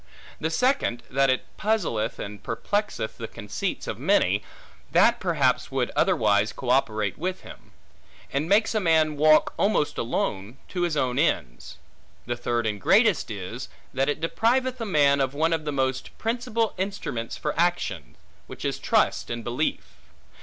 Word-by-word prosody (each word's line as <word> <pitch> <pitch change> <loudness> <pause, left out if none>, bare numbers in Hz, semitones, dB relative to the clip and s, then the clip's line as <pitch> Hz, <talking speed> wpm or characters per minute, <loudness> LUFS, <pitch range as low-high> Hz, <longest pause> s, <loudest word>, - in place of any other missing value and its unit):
The 160 - -1
second, 250 - +1
that 135 +1 +3
it 130 - +1
puzzleth 170 - 0
and 100 0 -7
perplexeth 200 - -2
the 115 - -4
conceits 105 -3 -4
of - - -5
many, - - +2 0.5
that - - +4
perhaps - - +1
would - - -1
otherwise 105 0 +3
co 125 -2 -2
operate 110 -6 +1
with 185 +3 -3
him; - - -13 0.6
and 145 +4 -1
makes 215 +4 +3
a 215 - +2
man 160 -4 +3
walk 155 +1 +4
almost 200 -7 +1
alone, 105 0 -2
to 180 - -3
his 170 -3 0
own 130 -1 0
ends. - - -1 0.5
The 120 - -2
third 120 -1 -1
and 105 -2 -2
greatest 210 - +4
is, 110 +5 -6 0.2
that 135 +2 +1
it 145 - -1
depriveth 245 +8 +1
a 225 - -2
man 140 -5 +4
of 135 +1 -1
one 160 +3 +2
of 160 -2 -2
the 150 - -1
most 130 -1 -2
principal 230 -1 -1
instruments 190 - -3
for 150 - -2
action; 165 - -1 0.3
which - - -8
is - - -1
trust - - +1
and 120 0 -4
belief. 120 +7 -1
140 Hz, 160 wpm, -25 LUFS, 115-185 Hz, 0.6 s, that